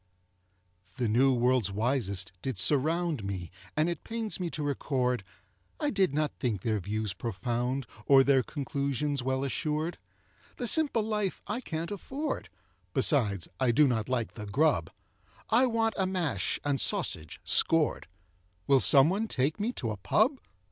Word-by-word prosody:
The 125 -3 0
new 125 +5 +4
world's 125 -4 +2
wisest 105 -3 -1
did 130 -6 -3
surround 150 - +1
Me; 95 -4 -5 0.3
and 155 +2 +3
it 170 -2 -3
pains 225 -3 -3
me 180 -2 -2
to 155 - -4
record 125 -5 -1 0.6
I 295 -1 0
did 195 -6 +2
not 150 +1 0
think 110 -7 -1
their 110 -2 0
views 105 +1 -3
profound, 120 +4 -2 0.2
Or 135 -1 +7
their 135 -1 +4
conclusions 140 0 -2
well 130 +1 -1
assured; 155 +4 -2 0.6
The 245 - -3
simple 280 -4 +2
life 210 -3 -1
I 215 +5 -3
can't 165 -4 -4
afford, 270 - -4 0.5
Besides, 110 - +2
I 130 -2 +2
do 145 +5 +5
not 115 -2 -1
like 120 -3 -1
the 105 -2 -8
grub 105 - +2 0.6
I 250 +3 +5
want 225 -1 +1
a 190 - +2
mash 180 -6 -1
and 140 -2 +1
sausage, 80 -2 0
`scored' 165 -2 +2 0.6
Will 140 -1 +5
someone 165 - +4
take 140 +1 -1
me 220 +4 0
to 115 - -3
a 105 - -5
pub? 220 - +2
140 Hz, 150 wpm, -29 LUFS, 120-175 Hz, 0.6 s, Or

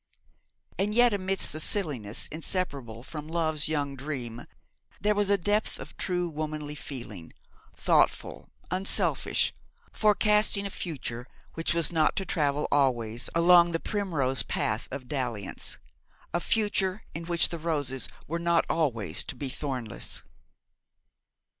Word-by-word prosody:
And 210 +2 +1
yet 240 -1 +6
amidst 195 -1 +1
the 155 - -5
silliness 145 - +1
inseparable 145 - -3
from 150 +2 -7
love's 160 -2 +1
young 145 -3 -1
dream, 130 -4 -5 0.5
there 210 +1 +2
was 205 -1 +1
a 200 - +5
depth 205 +3 0
of - - -9
true 180 -1 0
womanly 155 -2 -4
feeling, 120 - -7 0.4
thoughtful, - - +1 0.2
unselfish, 185 +2 +2 0.4
forecasting 210 -1 +3
a 200 - -3
future 125 -9 -4 0.3
which 165 +1 0
was 170 -1 +3
not 160 -2 +3
to 195 - -1
travel 150 -4 +1
always 120 -5 +1
along 170 0 +6
the 165 - +1
primrose 160 -12 +1
path 110 +2 -1
of 130 -1 -6
dalliance 120 -8 -4 0.6
a 175 - +2
future 205 -1 +1
in 165 +1 -5
which 170 -1 +2
the 170 - -4
roses 145 -6 -1 0.2
were 170 +3 -3
not 170 0 +3
always 115 - 0
to - - -6
be 135 +2 -3
thornless. 130 -5 -4
155 Hz, 130 wpm, -28 LUFS, 130-185 Hz, 0.6 s, yet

